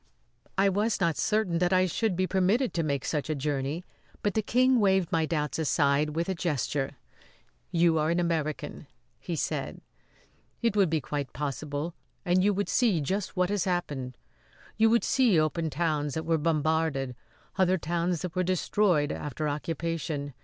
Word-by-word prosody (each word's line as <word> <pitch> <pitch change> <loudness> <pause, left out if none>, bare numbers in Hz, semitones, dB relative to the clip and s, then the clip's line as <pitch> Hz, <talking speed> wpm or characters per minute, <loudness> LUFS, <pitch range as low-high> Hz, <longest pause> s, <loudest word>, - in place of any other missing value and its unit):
I 195 +1 +4
was 205 +4 +1
not 170 -4 +2
certain 210 -6 +1
that 180 +1 +2
I 185 0 +4
should 195 +2 0
be 185 +1 +1
permitted 195 +7 +1
to 170 - 0
make 140 -4 -1
such 150 -1 -2
a 155 - 0
journey, 145 +4 -2 0.4
but 205 - +1
the 220 - +1
King 255 +3 +3
waved 190 -4 +2
my 160 -1 +1
doubts 150 -1 -1
aside 150 -1 +2
with 170 +1 -1
a 190 - 0
gesture. 145 -5 -2 0.7
"You 165 -2 +3
are 155 +1 +1
an 170 +1 +1
American," 160 -3 -2 0.3
he - - -4
said. - - -3 0.8
"It 230 -4 +1
would 195 -4 +4
be 160 -1 0
quite 145 -2 -4
possible 145 +3 -3 0.3
and 180 +1 +3
you 205 - +4
would 205 0 -1
see 225 -9 +2
just 190 +7 -2
what 180 +1 +2
has 205 -4 0
happened. 145 -9 -2 0.6
You 225 0 +4
would 235 +1 +3
see 240 -11 +3
open 160 +1 0
towns 150 -2 -1
that 160 0 -3
were 165 -1 +1
bombarded; 155 -4 0 0.4
other 185 0 +4
towns 170 +1 -1
that 180 -2 -4
were 185 - +2
destroyed 180 -3 +1
after 150 +1 -3
occupation! 150 -1 -3
165 Hz, 170 wpm, -28 LUFS, 150-185 Hz, 0.8 s, I